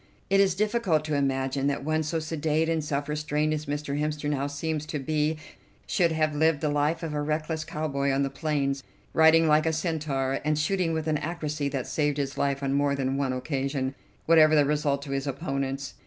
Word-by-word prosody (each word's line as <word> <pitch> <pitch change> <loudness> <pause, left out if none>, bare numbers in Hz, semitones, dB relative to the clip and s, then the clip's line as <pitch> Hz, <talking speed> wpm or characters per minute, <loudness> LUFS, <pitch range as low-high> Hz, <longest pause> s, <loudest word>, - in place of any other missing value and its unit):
It 195 - +5
is 195 -2 +4
difficult 205 -7 +1
to 155 - -2
imagine 135 -1 0
that 140 -1 -1
one 155 +1 +1
so 155 +2 -2
sedate 160 0 0
and 165 -1 0
self 145 -1 -2
restrained 150 0 0
as 155 -1 -4
Mr. 145 0 -2
Hemster 150 0 -2
now 140 -1 0
seems 150 +1 -3
to 150 - -3
be 150 +2 0 0.5
should 170 -3 +2
have 155 -1 +1
lived 160 0 +2
the 155 - +1
life 150 +3 0
of 160 -2 -3
a 150 - -1
reckless 155 +1 -2
cowboy 140 -3 -2
on 135 +1 +1
the 135 - -2
plains, 140 -2 -1 0.3
riding 160 0 +6
like 155 +1 +4
a - - +3
centaur, 145 -5 -1
and 150 0 +1
shooting 165 +2 +1
with 160 -1 -2
an 155 -1 +1
accuracy 150 -3 -3
that 135 -3 -3
saved 145 -2 0
his 140 -1 -2
life 140 0 -1
on 135 0 0
more 140 0 +2
than 135 -1 -1
one 135 -1 0
occasion, 135 0 -2 0.3
whatever 155 -1 +6
the 145 -1 +5
result 145 -1 0
to 140 - -7
his 135 +1 -2
opponents. 135 0 -3
150 Hz, 205 wpm, -27 LUFS, 140-155 Hz, 0.5 s, riding